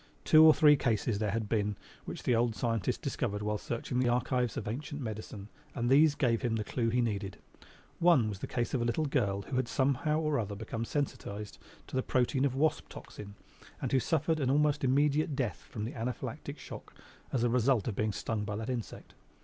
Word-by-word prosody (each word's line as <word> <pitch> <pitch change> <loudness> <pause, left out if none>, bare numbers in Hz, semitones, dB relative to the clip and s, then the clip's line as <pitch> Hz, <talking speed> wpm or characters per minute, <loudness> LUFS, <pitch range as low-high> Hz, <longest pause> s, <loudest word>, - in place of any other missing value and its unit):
Two 155 0 +7
or 160 - +10
three 150 -1 +6
cases 115 -5 0
there 105 -1 0
had 110 +1 -2
been 105 -1 0 0.3
which - - -7
the 125 - +2
old 115 -1 +1
scientist 115 -2 -1
discovered 105 +1 -2
while 105 0 -1
searching 120 +1 -3
the 125 -1 +2
archives 125 -1 0
of 110 - -4
ancient 145 +6 -4
medicine 110 -4 -6 0.3
and 120 -1 0
these 150 +2 +6
gave 115 -4 +1
him 120 -3 0
the 110 - -1
clew 115 +2 -1
he 125 +2 +2
needed. 100 -4 -2 0.6
One 165 -10 +5
was 100 -3 -5
the - - -5
case 120 -1 -2
of 130 - +1
a - - +1
little 120 +7 0
girl 100 -9 0
who 130 +5 -4
had 130 -2 +1
somehow 140 +4 +1
or 150 -2 0
other 105 -2 -3
become 110 +2 -4
sensitized 105 -7 -4 0.3
to - - -9
the 130 - +2
protein 130 +2 +1
of 135 -2 0
wasp 155 +3 +1
toxin 100 -1 -10 0.4
and - - -3
who 135 - +4
suffered 160 +3 0
almost 145 +2 +2
immediate 145 +3 +2
death 120 - -3
from 105 -1 -4
anaphylactic 120 +1 -5
"choc" - - -10 0.4
as 125 -3 0
the 120 - +3
result 125 -2 +2
of 110 - -2
being 105 +1 0
stung 105 +1 -3
by 105 0 -3
that 110 +4 -3
insect. 120 -3 -6
120 Hz, 205 wpm, -31 LUFS, 110-140 Hz, 0.6 s, or